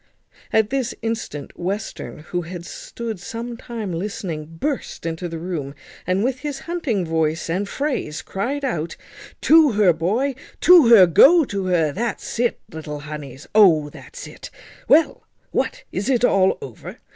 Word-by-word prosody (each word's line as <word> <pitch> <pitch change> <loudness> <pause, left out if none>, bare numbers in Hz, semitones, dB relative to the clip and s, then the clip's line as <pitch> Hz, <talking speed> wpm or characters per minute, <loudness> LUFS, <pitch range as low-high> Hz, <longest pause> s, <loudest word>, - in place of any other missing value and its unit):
At 220 0 +2
this 265 -3 -1
instant 225 -10 -4
Western, 190 -3 -4
who 175 - 0
had 170 0 -8
stood 225 0 -6
some 235 +5 -6
time 230 -5 -6
listening, 175 -4 -4
burst 285 - -3
into 165 +2 -3
the 165 - -5
room, 160 -5 -5 0.3
and, 185 +3 +1
with 260 +1 -1
his 290 -2 -5
hunting 285 - -2
voice 160 0 -1
and 195 +4 -1
phrase, 270 - -3
cried 270 +9 -3
out, 170 - -3 0.4
"To 310 -5 +6
her, 200 -4 +4
boy, 215 - 0 0.3
to 350 -7 +8
her, 225 -5 +9
go 295 - +6
to 195 -5 -3
her. 165 -4 +2
That's 230 +5 -4
it, 240 -1 +1
little 150 -2 -7
honeys, 145 -2 -8
O 170 -9 +5
that's - - -11
it! - - -10 0.4
Well! 315 +1 +3 0.2
what, - - -2
is 200 +7 -2
it 250 -2 +3
all 190 -4 +3
over? - - -9
200 Hz, 155 wpm, -21 LUFS, 165-245 Hz, 0.4 s, her